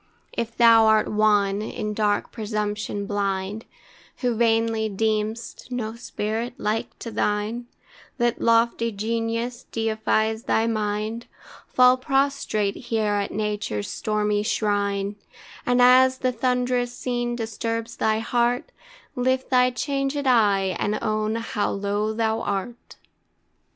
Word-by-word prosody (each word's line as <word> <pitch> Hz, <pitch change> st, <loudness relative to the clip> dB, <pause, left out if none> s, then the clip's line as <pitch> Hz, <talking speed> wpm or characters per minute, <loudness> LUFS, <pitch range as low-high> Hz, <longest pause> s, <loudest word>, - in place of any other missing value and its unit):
If 230 Hz, 0 st, -4 dB
thou 230 Hz, -2 st, +7 dB
art 220 Hz, 0 st, +4 dB
one, 210 Hz, -2 st, +2 dB
in 210 Hz, 0 st, -4 dB
dark 210 Hz, -1 st, 0 dB
presumption 210 Hz, -2 st, -3 dB
blind, 200 Hz, +1 st, -2 dB, 0.6 s
Who 245 Hz, -2 st, +1 dB
vainly 225 Hz, -1 st, +1 dB
deem'st 220 Hz, +3 st, -2 dB
no 230 Hz, -3 st, -3 dB
spirit 230 Hz, +1 st, -4 dB
like 215 Hz, -2 st, -2 dB
to 230 Hz, -, -7 dB
thine, 215 Hz, +4 st, -1 dB, 0.5 s
That 240 Hz, -2 st, 0 dB
lofty 230 Hz, 0 st, +3 dB
genius 230 Hz, +3 st, -3 dB
deifies 220 Hz, 0 st, 0 dB
thy 225 Hz, -, +2 dB
mind, 215 Hz, +1 st, -2 dB, 0.4 s
Fall 250 Hz, 0 st, +5 dB
prostrate 270 Hz, -7 st, 0 dB
here 220 Hz, -4 st, -1 dB
at 200 Hz, -1 st, 0 dB
Nature's 210 Hz, -, -2 dB
stormy 210 Hz, -1 st, 0 dB
shrine, 205 Hz, -2 st, -1 dB, 0.5 s
And 245 Hz, 0 st, +3 dB
as 255 Hz, +1 st, +6 dB
the 255 Hz, -1 st, 0 dB
thunderous 250 Hz, 0 st, 0 dB
scene 240 Hz, -1 st, -2 dB
disturbs 230 Hz, 0 st, -4 dB
thy 220 Hz, 0 st, +2 dB
heart, 245 Hz, -, 0 dB, 0.4 s
Lift 260 Hz, +1 st, 0 dB
thy 250 Hz, -1 st, +5 dB
changed 275 Hz, +2 st, -2 dB
eye, 200 Hz, -7 st, +3 dB
and 210 Hz, +1 st, 0 dB
own 215 Hz, 0 st, 0 dB
how 230 Hz, -2 st, -1 dB
low 205 Hz, +2 st, -1 dB
thou 220 Hz, 0 st, 0 dB
art. 205 Hz, +4 st, -4 dB
225 Hz, 120 wpm, -24 LUFS, 210-240 Hz, 0.6 s, thou